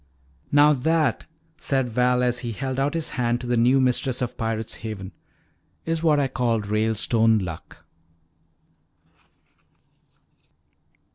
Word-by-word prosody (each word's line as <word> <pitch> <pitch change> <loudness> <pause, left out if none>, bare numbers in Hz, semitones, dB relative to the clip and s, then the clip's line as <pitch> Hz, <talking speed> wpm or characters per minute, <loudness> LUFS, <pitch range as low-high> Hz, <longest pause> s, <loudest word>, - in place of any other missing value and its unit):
"Now 145 +1 +6
that," 155 +3 0 0.3
said 135 -2 -1
Val, 125 +1 +1
as 125 0 +1
he 120 -2 -4
held 130 +3 -4
out 140 +3 0
his 165 -2 -3
hand 120 -1 -1
to - - -7
the 120 0 0
new 125 +3 +3
mistress 130 0 +1
of 125 -2 -3
Pirate's 110 -1 -3
Haven, 105 -4 -7 0.7
"is 165 0 -1
what 155 -3 +3
I 140 - +1
call 120 -3 0
'Ralestone 110 +2 +1
Luck.'" 85 -6 -7
125 Hz, 125 wpm, -23 LUFS, 115-135 Hz, 0.7 s, Now